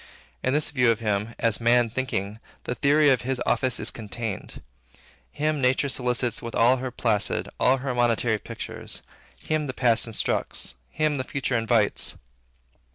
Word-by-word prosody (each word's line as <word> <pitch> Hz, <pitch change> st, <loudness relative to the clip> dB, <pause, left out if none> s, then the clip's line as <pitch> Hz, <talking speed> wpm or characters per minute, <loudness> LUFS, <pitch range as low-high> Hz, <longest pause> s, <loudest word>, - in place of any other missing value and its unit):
In 130 Hz, -, 0 dB
this 150 Hz, +1 st, +1 dB
view 125 Hz, -4 st, +3 dB
of 115 Hz, -, +2 dB
him, 105 Hz, 0 st, -1 dB
as 115 Hz, -1 st, +2 dB
Man 120 Hz, +1 st, +4 dB
Thinking, 110 Hz, -4 st, -3 dB, 0.2 s
the -, -, -2 dB
theory 145 Hz, +4 st, +4 dB
of 130 Hz, -4 st, +2 dB
his 130 Hz, +1 st, -2 dB
office 125 Hz, +1 st, +1 dB
is -, -, +2 dB
contained. 110 Hz, -1 st, -5 dB, 0.7 s
Him 150 Hz, -1 st, -1 dB
nature 130 Hz, +2 st, +2 dB
solicits 125 Hz, -2 st, -1 dB
with 115 Hz, -, -6 dB
all 125 Hz, +3 st, +5 dB
her 130 Hz, 0 st, -3 dB
placid, 110 Hz, -4 st, 0 dB
all 130 Hz, +1 st, +4 dB
her 135 Hz, 0 st, -3 dB
monitory 120 Hz, -2 st, +2 dB
pictures; -, -, -7 dB, 0.4 s
him 155 Hz, -1 st, 0 dB
the 130 Hz, -, -5 dB
past 120 Hz, -2 st, +2 dB
instructs; 105 Hz, -, -2 dB, 0.2 s
him 155 Hz, -, 0 dB
the 130 Hz, -, -1 dB
future 130 Hz, -1 st, -2 dB
invites. 115 Hz, -2 st, +1 dB
125 Hz, 160 wpm, -25 LUFS, 115-130 Hz, 0.7 s, all